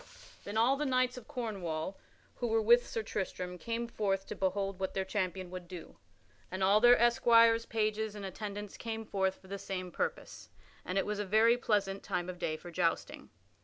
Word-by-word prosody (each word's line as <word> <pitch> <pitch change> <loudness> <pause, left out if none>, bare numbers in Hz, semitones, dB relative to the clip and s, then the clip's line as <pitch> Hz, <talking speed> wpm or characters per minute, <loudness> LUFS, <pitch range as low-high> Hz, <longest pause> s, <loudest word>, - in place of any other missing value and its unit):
Then 205 +2 -4
all 250 +5 +4
the 300 - -1
knights 255 -1 +2
of 250 -3 -10
Cornwall 190 -7 -3 0.4
who 245 - -1
were 225 0 +2
with 235 +3 +5
Sir 225 - -3
Tristram 180 -3 -4
came 235 +3 -3
forth 195 -4 -1
to - - -6
behold 195 0 -1
what 190 - -3
their 190 -1 0
champion 185 -2 -2
would 180 -1 -7
do, 180 -2 -10 0.5
and 190 +1 -3
all 200 +3 +5
their 245 +1 +8
esquires, 230 -1 +5
pages, 215 -1 -1
and 205 -1 -6
attendants 205 +1 -6
came 225 -1 -5
forth 190 -2 0
for 190 - -19
the 200 +1 -5
same 185 -2 -5
purpose, - - -4 0.3
and 185 - -3
it 195 - +2
was 210 0 -2
a - - 0
very 220 +4 +4
pleasant 200 -5 0
time 175 +1 -3
of 180 -1 -7
day 155 -3 -1
for 175 +2 -10
jousting. 170 -1 -1
205 Hz, 195 wpm, -32 LUFS, 190-230 Hz, 0.5 s, their